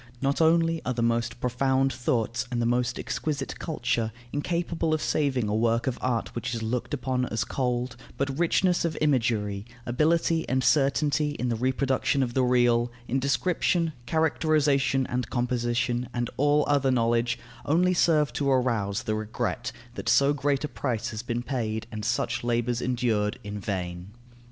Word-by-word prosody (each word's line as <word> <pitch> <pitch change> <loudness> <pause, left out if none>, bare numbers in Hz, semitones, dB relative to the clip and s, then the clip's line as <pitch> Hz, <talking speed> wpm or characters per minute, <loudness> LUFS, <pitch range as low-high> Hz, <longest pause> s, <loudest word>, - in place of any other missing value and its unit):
Not 140 +4 0
only 165 0 +3
are 125 - -2
the 115 - 0
most 115 +1 0
profound 130 +2 +1
thoughts 120 0 -1
and 120 -2 -2
the 120 - +1
most 120 +1 +1
exquisite 145 -3 -3
culture 120 -7 -1 0.2
incapable 165 +1 0
of 155 - -4
saving 130 -7 +1
a 105 - -1
work 115 +1 +1
of 130 - -2
art 120 -3 -1
which 120 0 -3
is 115 - -4
looked 115 +2 -2
upon 125 -1 -1
as 110 - -1
cold, 125 -2 -2 0.2
but 135 -1 -1
richness 175 +1 +2
of 165 -2 -1
imagery, 110 -8 +1 0.2
ability 160 +5 +1
and 130 0 +1
certainty 145 +2 +2
in 125 - -1
the 115 - 0
reproduction 130 +2 +1
of 120 -2 -3
the 130 - +2
real, 120 -1 +3 0.2
in 135 - 0
description, 165 +4 +1
characterization 150 -4 +2
and 125 -1 -3
composition, 120 0 -1
and 120 -1 -1
all 145 +2 +3
other 140 -2 +2
knowledge, 120 -1 +2 0.3
only 180 +5 +3
serve 155 -6 +3
to 140 +2 0
arouse 115 -6 +1
the 110 - -1
regret 110 0 -3 0.2
that - - -4
so 140 +1 +5
great 140 -1 0
a - - 0
price 120 -5 -2
has 110 0 -4
been 120 0 -3
paid 110 -5 -2
and 110 -1 -5
such 115 +2 -1
labours 120 0 0
endured, 115 -4 0
in 105 0 -5
vain. 90 -2 -4
125 Hz, 165 wpm, -27 LUFS, 115-145 Hz, 0.3 s, so